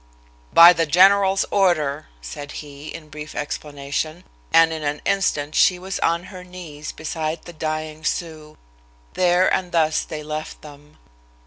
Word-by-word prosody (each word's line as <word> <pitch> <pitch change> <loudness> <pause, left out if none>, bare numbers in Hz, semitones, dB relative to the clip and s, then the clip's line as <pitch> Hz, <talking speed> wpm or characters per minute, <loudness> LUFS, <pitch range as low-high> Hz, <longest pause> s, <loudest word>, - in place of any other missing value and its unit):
"By 170 +1 +9
the 165 -1 0
general's 195 +4 +4
order," 155 -7 +1 0.2
said 145 - -8
he, 145 0 -9
in 155 -2 -9
brief 150 +1 -9
explanation, 150 +3 -4 0.3
and 165 0 +5
in 160 - -5
an 145 0 -2
instant 155 -7 0
she 180 - +4
was 190 +2 -5
on 170 +1 +1
her 180 -1 -9
knees 170 -5 -9
beside 160 0 -4
the 175 - -11
dying 155 0 -4
Sioux. 155 -3 -4 0.6
There 180 0 +3
and 180 -2 -1
thus 160 -2 +2
they 155 -1 -7
left 155 +1 -6
them. 150 0 -14
155 Hz, 145 wpm, -22 LUFS, 150-175 Hz, 0.6 s, By